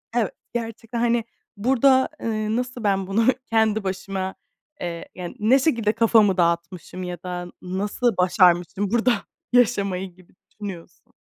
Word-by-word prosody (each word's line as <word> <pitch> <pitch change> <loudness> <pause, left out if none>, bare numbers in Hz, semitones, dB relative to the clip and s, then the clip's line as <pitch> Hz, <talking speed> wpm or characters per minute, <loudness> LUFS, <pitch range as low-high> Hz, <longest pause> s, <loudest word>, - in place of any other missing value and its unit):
Eve 225 -5 +1 0.2
gerçekten 230 0 -4
hani 235 0 +2 0.3
burada, 260 +4 +4
eee, 215 -1 -1
nasıl 245 0 -3
ben 195 -2 +1
bunu 215 +4 +2 0.2
kendi 220 -1 +2
başıma, 190 0 -3 0.5
eee, 170 -1 -5
yani 180 +2 -7
ne 235 +6 +4
şekilde 230 -7 +1
kafamı 215 -4 +4
dağıtmışım 170 +1 -1
ya 180 -1 -5
da 180 -1 -5
nasıl 200 +5 -1
başarmışım 180 +2 +3
burada 235 +1 +3 0.4
yaşamayı 200 -6 +2
gibi 185 -2 -21 0.2
düşünüyorsun. 195 -5 -10
205 Hz, 130 wpm, -23 LUFS, 185-230 Hz, 0.5 s, burada